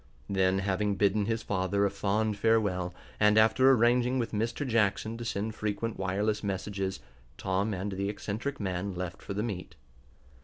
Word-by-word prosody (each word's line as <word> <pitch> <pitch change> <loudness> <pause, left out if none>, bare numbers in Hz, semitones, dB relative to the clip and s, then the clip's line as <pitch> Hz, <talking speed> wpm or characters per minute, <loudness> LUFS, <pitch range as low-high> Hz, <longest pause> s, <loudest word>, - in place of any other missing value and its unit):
Then, 95 -1 +2
having 100 +1 0
bidden 100 +1 +2
his 115 0 -1
father 95 +1 +1
a 100 - +1
fond 105 +2 0
farewell, 100 -5 +1 0.3
and 105 0 +5
after 110 +5 +5
arranging 125 0 +4
with 120 -3 -1
Mr. 115 +6 -1
Jackson 110 -1 +1
to - - -4
send 110 -1 -2
frequent 110 +1 -3
wireless 100 +3 0
messages, 95 -4 -3 0.4
Tom 95 +3 0
and 100 +1 -3
the 100 +1 -2
eccentric 110 +7 -4
man 95 -1 -2
left 90 +1 -5
for 100 - -6
the 105 - -1
meet. 90 -7 -5
105 Hz, 160 wpm, -29 LUFS, 95-110 Hz, 0.4 s, and